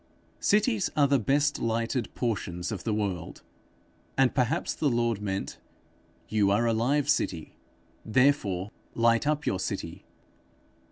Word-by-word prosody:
Cities 210 Hz, 0 st, +2 dB
are 145 Hz, -1 st, +5 dB
the 140 Hz, -1 st, +3 dB
best 145 Hz, +6 st, +1 dB
lighted 115 Hz, +1 st, -1 dB
portions 90 Hz, -6 st, -2 dB
of 105 Hz, -, -5 dB
the 115 Hz, -, 0 dB
world; 100 Hz, -5 st, -3 dB, 0.7 s
and 130 Hz, -2 st, +4 dB
perhaps 125 Hz, -3 st, 0 dB
the 150 Hz, -, 0 dB
Lord 120 Hz, -3 st, 0 dB
meant, 95 Hz, -1 st, -4 dB, 0.7 s
'You 105 Hz, -2 st, +2 dB
are 105 Hz, +4 st, +2 dB
a 115 Hz, -, +2 dB
live 135 Hz, +6 st, +1 dB
city, 90 Hz, -, -1 dB, 0.5 s
therefore 110 Hz, -6 st, +1 dB, 0.2 s
light 115 Hz, +3 st, +3 dB
up 150 Hz, 0 st, 0 dB
your 95 Hz, -, 0 dB
city.' -, -, -4 dB
115 Hz, 130 wpm, -28 LUFS, 105-140 Hz, 0.7 s, are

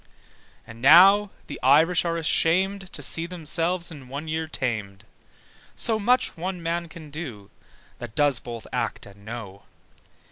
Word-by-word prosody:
And 115 Hz, 0 st, -13 dB
now 195 Hz, +8 st, +7 dB, 0.2 s
the -, -, -8 dB
Irish 160 Hz, +7 st, +4 dB
are 170 Hz, 0 st, -1 dB
ashamed 185 Hz, +4 st, +1 dB
To -, -, -6 dB
see 165 Hz, +1 st, +2 dB
themselves 170 Hz, +1 st, -1 dB
in 140 Hz, -5 st, -11 dB
one 140 Hz, +4 st, -6 dB
year 160 Hz, 0 st, -2 dB
tamed: 110 Hz, -9 st, -3 dB, 0.7 s
So 220 Hz, -2 st, 0 dB
much 250 Hz, +4 st, +1 dB
one 180 Hz, 0 st, -5 dB
man 170 Hz, +1 st, -2 dB
can 155 Hz, -2 st, -12 dB
do, 125 Hz, -, -8 dB, 0.5 s
That 120 Hz, -2 st, -9 dB
does 145 Hz, -4 st, +2 dB
both 115 Hz, 0 st, -8 dB
act -, -, -3 dB
and 100 Hz, 0 st, -16 dB
know. 105 Hz, -3 st, -8 dB
160 Hz, 145 wpm, -24 LUFS, 120-175 Hz, 0.7 s, now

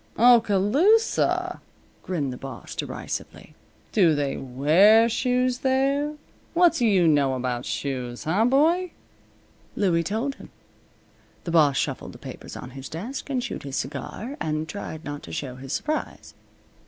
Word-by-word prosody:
"Oskaloosa!" 240 Hz, -, +3 dB, 0.4 s
grinned 150 Hz, -8 st, -2 dB
the -, -, -8 dB
boss, 135 Hz, -3 st, -8 dB
derisively. -, -, -6 dB, 0.4 s
"Do 175 Hz, -7 st, +4 dB
they 140 Hz, -2 st, -1 dB
wear 165 Hz, -, +4 dB
shoes 250 Hz, +1 st, 0 dB
there? 275 Hz, +3 st, +1 dB, 0.4 s
What 345 Hz, -1 st, +5 dB
do 245 Hz, -8 st, +1 dB
you 185 Hz, -5 st, +4 dB
know 140 Hz, -4 st, +3 dB
about 125 Hz, -1 st, -3 dB
shoes, 125 Hz, -3 st, -4 dB
huh 190 Hz, +8 st, +2 dB
boy?" 325 Hz, +8 st, +2 dB, 0.8 s
Louie 175 Hz, -5 st, +2 dB
told 220 Hz, -, -2 dB
him. -, -, -12 dB, 0.9 s
The 170 Hz, -, -4 dB
boss 150 Hz, -4 st, +4 dB
shuffled -, -, -3 dB
the -, -, -11 dB
papers -, -, -9 dB
on 125 Hz, -, -9 dB
his 135 Hz, +1 st, -8 dB
desk, 235 Hz, -, -6 dB
and 255 Hz, -3 st, -1 dB
chewed 240 Hz, -, -5 dB
his 135 Hz, -1 st, -6 dB
cigar, 220 Hz, -, -5 dB
and 155 Hz, 0 st, -2 dB
tried 160 Hz, -4 st, -7 dB
not 145 Hz, 0 st, -5 dB
to 85 Hz, -, -10 dB
show 125 Hz, -, -5 dB
his 135 Hz, 0 st, -8 dB
surprise. 305 Hz, -, -3 dB
185 Hz, 140 wpm, -25 LUFS, -, 0.9 s, What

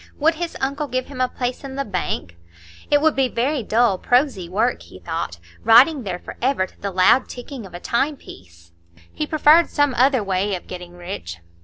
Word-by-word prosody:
Would 320 Hz, +3 st, +3 dB
his 335 Hz, +1 st, -5 dB
uncle 280 Hz, +3 st, -2 dB
give 255 Hz, 0 st, -2 dB
him 270 Hz, -3 st, -6 dB
a 255 Hz, -, +3 dB
place 250 Hz, +1 st, -4 dB
in 270 Hz, -1 st, -7 dB
the 275 Hz, 0 st, -2 dB
bank? 175 Hz, -, -3 dB, 0.5 s
It 290 Hz, 0 st, +4 dB
would 315 Hz, -1 st, +3 dB
be 265 Hz, -1 st, +2 dB
very 255 Hz, +4 st, -1 dB
dull, 220 Hz, -3 st, +2 dB
prosy 245 Hz, -, +1 dB
work, 225 Hz, +7 st, 0 dB
he -, -, -13 dB
thought, 165 Hz, -, -4 dB, 0.3 s
writing 255 Hz, +7 st, +6 dB
there 190 Hz, -6 st, -4 dB
forever 250 Hz, +2 st, -1 dB
to -, -, -21 dB
the 200 Hz, -, -2 dB
loud 190 Hz, +7 st, +3 dB
ticking 245 Hz, -3 st, -8 dB
of 180 Hz, -, -13 dB
a -, -, -6 dB
timepiece. 95 Hz, -, -4 dB, 0.4 s
He 305 Hz, -, -3 dB
preferred 310 Hz, +2 st, +5 dB
some 290 Hz, -2 st, +1 dB
other 255 Hz, -1 st, +3 dB
way 195 Hz, +1 st, 0 dB
of 180 Hz, -, -8 dB
getting 180 Hz, -1 st, -9 dB
rich. 175 Hz, -, -7 dB
245 Hz, 190 wpm, -21 LUFS, 185-275 Hz, 0.5 s, writing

